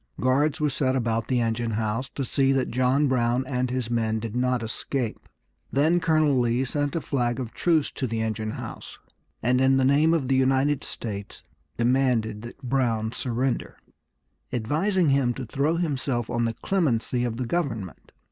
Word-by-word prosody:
Guards 140 +4 +2
were 150 -1 +1
set 130 -1 0
about 115 -2 0
the 125 -2 +1
engine 115 0 -1
house 115 +4 -2
to 135 - -2
see 135 +2 +2
that 135 -1 0
John 130 +4 +2
Brown 125 0 +1
and 125 -1 -1
his 125 -2 -2
men 110 -2 +1
did 115 0 -5
not 125 -1 +1
escape. 115 +1 -4 0.4
Then 160 +6 +3
Colonel 155 -5 +3
Lee 120 +2 +1
sent 145 +3 -1
a 165 - 0
flag 120 -4 -1
of 120 -3 -5
truce 160 -4 +1
to 130 - -3
the 115 -1 -2
engine 110 -1 -2
house, - - -8 0.5
and 125 +2 +3
in 135 0 +4
the 130 - +3
name 150 +5 +4
of 140 -6 -1
the 135 - +2
United 135 +2 +2
States 100 -3 -5 0.3
demanded 120 -3 +1
that 120 +4 -11
Brown 120 -4 0
surrender, 125 +1 -2 0.7
advising 155 - +1
him 135 -3 +2
to 130 - -5
throw 140 +7 0
himself 135 -8 -1
on 120 -1 +1
the 115 -1 -2
clemency 125 -10 0
of 115 -2 -2
the 125 - -2
government. 115 - -3
130 Hz, 175 wpm, -25 LUFS, 115-140 Hz, 0.7 s, in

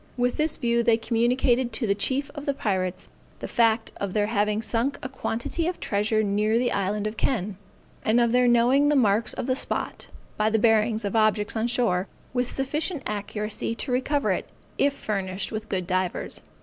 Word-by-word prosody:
With 245 0 0
this 310 0 +1
view 235 -2 +1
they 230 -1 +3
communicated 240 +2 +1
to 230 - +1
the 200 - +2
chief 265 +7 -1
of 290 0 -8
the 280 - +1
pirates 185 -7 -2 0.3
the - - -6
fact 225 -1 +2
of 200 -2 -3
their 210 -1 +2
having 210 0 0
sunk 240 +5 0
a - - -2
quantity 265 +5 -3
of 355 - -3
treasure 215 +1 +1
near 210 +2 +1
the 245 0 +1
island 200 +1 -1
of 215 +1 -3
Kenn, 210 -6 -1 0.5
and 220 +3 +3
of 235 -1 +3
their 250 0 +4
knowing 245 +4 +4
the 295 - +3
marks 220 -3 +3
of - - -4
the 255 0 +1
spot, - - -3 0.3
by 215 0 +2
the 220 - +2
bearings 220 -1 +3
of 200 - -2
objects 215 -1 +2
on 225 +1 0
shore, 225 -6 +1 0.3
with 250 -1 0
sufficient 295 +3 -1
accuracy 210 +2 -3
to 250 - -3
recover 280 +3 +1
it, - - -2 0.3
if 285 0 +3
furnished 195 -5 -3
with 215 0 -5
good 185 -2 -1
divers. 185 0 -2
225 Hz, 190 wpm, -25 LUFS, 210-250 Hz, 0.5 s, their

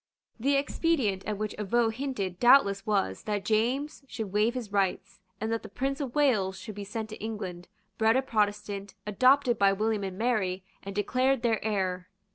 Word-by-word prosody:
The 275 +5 +2
expedient 275 - 0
at 210 -1 -2
which 215 0 -3
Avaux 225 +2 +1
hinted 220 -9 -3
doubtless 200 -6 +5
was 145 - 0
that 205 -2 -2
James 250 +8 0
should 220 -7 -5
waive 215 +4 +2
his 235 -5 -5
rights, 195 -2 -1 0.2
and 220 +1 -2
that 230 - -1
the - - -10
Prince 270 +7 -2
of 260 -4 -4
Wales 215 -10 +2
should 190 +3 -8
be 205 0 -6
sent 215 +2 -5
to 215 - -9
England, 185 -5 -5 0.3
bred 225 +2 +4
a 265 - +1
Protestant, 205 -4 -1
adopted 255 +3 +3
by 195 -1 +5
William 215 +1 0
and 190 -1 -5
Mary, 200 -5 0 0.2
and 195 0 -7
declared 255 +5 +1
their 225 -2 +1
heir. 185 -4 -1
215 Hz, 180 wpm, -28 LUFS, 195-245 Hz, 0.3 s, doubtless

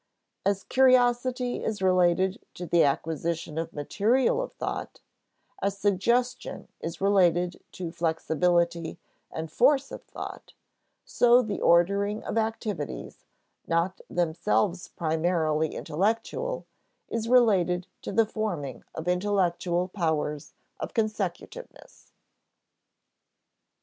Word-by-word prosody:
As 200 -1 +1
curiosity 250 -1 +3
is 215 -2 -2
related 185 +2 +2
to 180 - -6
the 170 0 +4
acquisition 160 +2 -1
of 165 0 -4
material 235 - +1
of - - -5
thought, - - -5 0.6
as 200 0 -1
suggestion 235 +6 0
is 165 +1 -6
related 180 -3 +3
to 175 -3 -5
flexibility 170 0 0 0.3
and 160 -1 -6
force 270 - +3
of - - -7
thought, - - -9 0.5
so 245 +1 +4
the 215 -3 -4
ordering 200 +5 +3
of - - -4
activities, 220 -7 -3 0.4
not 170 +3 0
themselves 175 +2 0
primarily 160 -1 0
intellectual, 225 - -1 0.4
is 230 0 -3
related 190 -8 +4 0.2
to - - -5
the 225 - +4
forming 175 - -4
of 160 +2 -6
intellectual 180 -2 +1
powers 155 -5 -2 0.3
of - - -6
consecutiveness. 215 - -4
185 Hz, 100 wpm, -27 LUFS, 170-220 Hz, 0.6 s, the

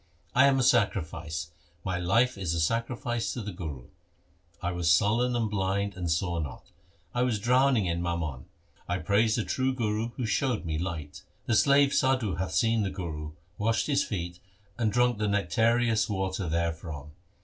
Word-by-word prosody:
I 135 +2 +6
am 135 -1 +3
a 130 - +2
sacrifice, 80 - 0 0.3
my 90 -2 -2
life 115 +9 +2
is 90 -5 -2
a - - -1
sacrifice 115 - -1
to 120 - -4
the 105 - -5
Guru. 80 -9 -7 0.7
I 90 - -2
was 90 -2 0
sullen, 110 +8 +3
and 115 -2 +1
blind, 100 0 -1
and 90 -2 -3
saw 85 +1 0
not; 75 -3 -7 0.4
I 125 - 0
was 125 -3 +1
drowning 125 0 +3
in 85 -1 -1
mammon. 80 -7 -3 0.4
I 90 - +1
praise 105 +5 +2
the 115 - 0
true 130 0 0
Guru 110 -2 -1
Who 125 - -1
showed 115 -2 0
me 80 -1 -2
light. 80 -5 -5 0.2
The 115 - 0
slave 140 +4 +5
Sadhu 130 -8 +1
hath 90 -2 -3
seen 115 +7 +2
the 100 - 0
Guru, 80 -5 -5 0.3
Washed 110 +2 +1
his 140 -1 +2
feet 90 -3 -4 0.4
and 110 -3 0
drunk 120 0 +2
the 105 - +1
nectareous 110 +4 +2
water 95 -3 -2
there 85 +1 0
from. 75 -3 -8
100 Hz, 175 wpm, -28 LUFS, 85-120 Hz, 0.7 s, I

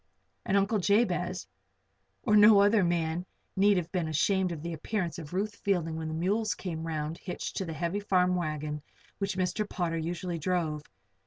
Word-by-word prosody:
And 195 - +3
Uncle 200 +2 +2
Jabez 185 -3 +1 0.8
or 210 - +3
no 210 0 +8
other 205 0 +5
man 170 0 0 0.3
need 200 +1 +4
have 170 -1 -2
been 175 -4 -1
ashamed 190 +3 +1
of 160 -3 -6
the 170 0 -3
appearance 175 +2 -3
of 150 -3 -9
Ruth 205 +4 -2
Fielding 175 -5 0
when 160 0 -4
the 155 - -3
mules 205 +6 0
came 165 -3 -5
around 155 0 -3
hitched 180 - -5
to 190 - -1
the 165 - -5
heavy 170 +5 -2
farm 180 -3 +2
wagon 155 -3 -3 0.4
which 195 -2 -2
Mr. 195 +3 -1
Potter 165 -2 -1
usually 170 +1 -3
drove. 160 -3 -1
180 Hz, 175 wpm, -29 LUFS, 160-200 Hz, 0.8 s, no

